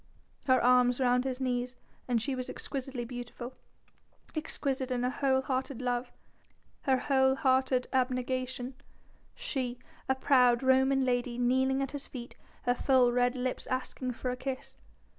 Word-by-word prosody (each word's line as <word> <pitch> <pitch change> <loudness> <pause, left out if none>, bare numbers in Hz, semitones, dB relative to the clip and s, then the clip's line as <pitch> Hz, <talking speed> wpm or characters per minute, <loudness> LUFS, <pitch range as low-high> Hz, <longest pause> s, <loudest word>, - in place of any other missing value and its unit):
Her 260 -2 +5
arms 250 0 +5
round 250 0 +3
his 260 -1 -2
knees, 250 -1 -1 0.3
and 245 -2 +2
she 270 +5 -2
was 255 -1 -4
exquisitely 265 -3 -5
beautiful, 245 +1 -7 0.8
exquisite 275 -4 -2
in 250 -1 -1
her 250 - +1
whole 265 -1 +1
hearted 260 -1 -2
love, 245 -1 -1 0.7
her 265 -2 +4
whole 265 0 +3
hearted 260 -1 +2
abnegation 255 0 -1 0.6
she, 250 -3 -3 0.3
a 265 - +4
proud 250 -2 +4
Roman 265 +1 +4
lady 245 -1 0
kneeling 260 +2 +2
at 270 - -4
his 285 -1 -6
feet, 240 -2 -8 0.3
her 245 - +3
full 250 -1 +4
red 245 +1 +2
lips 255 0 -3
asking 255 0 -2
for 250 +2 -3
a - - -2
kiss. 260 +1 -5
255 Hz, 145 wpm, -31 LUFS, 245-265 Hz, 0.8 s, Her